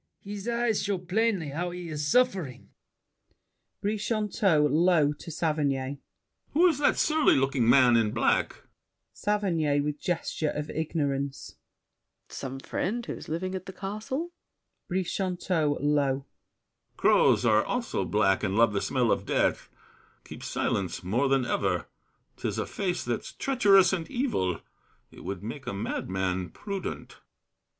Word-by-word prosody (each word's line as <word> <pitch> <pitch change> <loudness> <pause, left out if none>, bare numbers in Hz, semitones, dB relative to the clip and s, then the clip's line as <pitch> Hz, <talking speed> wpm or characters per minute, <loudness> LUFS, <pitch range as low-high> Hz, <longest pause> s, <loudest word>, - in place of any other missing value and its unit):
His 205 +1 -6
eyes 235 -2 +1
show 200 -1 0
plainly 185 -2 0
how 170 +5 -2
he's 165 -4 -4
suffering! 185 - +1 1.1
BRICHANTEAU 210 -6 +1
(low 155 0 +3
to 150 - -11
Saverny). 145 -4 -1 0.5
Who 335 +5 +5
is 325 -6 +3
that 290 - +3
surly 310 -1 +4
looking 135 -3 +2
man 125 -1 +6
in 115 -2 +3
black? 115 +2 0 0.5
SAVERNY 170 -9 0
(with 150 0 -3
gesture 165 -3 -1
of 150 0 -4
ignorance). 140 -4 -2 0.7
Some 135 0 -6
friend 235 - -3
who's - - -7
living 185 +4 -2
at 185 0 -5
the 190 - -7
castle? 215 - -4 0.6
BRICHANTEAU 180 -4 0
(low). 140 -2 +1 0.7
Crows - - +4
Are 110 -1 +4
also 240 - -2
black 95 -1 +2
and 100 -1 0
love 115 -1 +4
the 100 - 0
smell 125 -4 +1
of - - -1
death. - - +1 0.5
Keep - - -10
silence 95 -2 -2
more 120 +10 +1
than 135 -2 +2
ever. 95 -7 0 0.5
'Tis - - -3
a - - -1
face 180 -3 -2
That's 120 -1 -3
treacherous 200 -8 +4
and 170 -4 -2
evil; 230 - -1 0.5
it - - -13
would 100 -1 -5
make 125 +4 -7
A 125 - -2
madman 95 -3 -2
prudent. 200 -2 -6
155 Hz, 130 wpm, -28 LUFS, 130-195 Hz, 1.1 s, man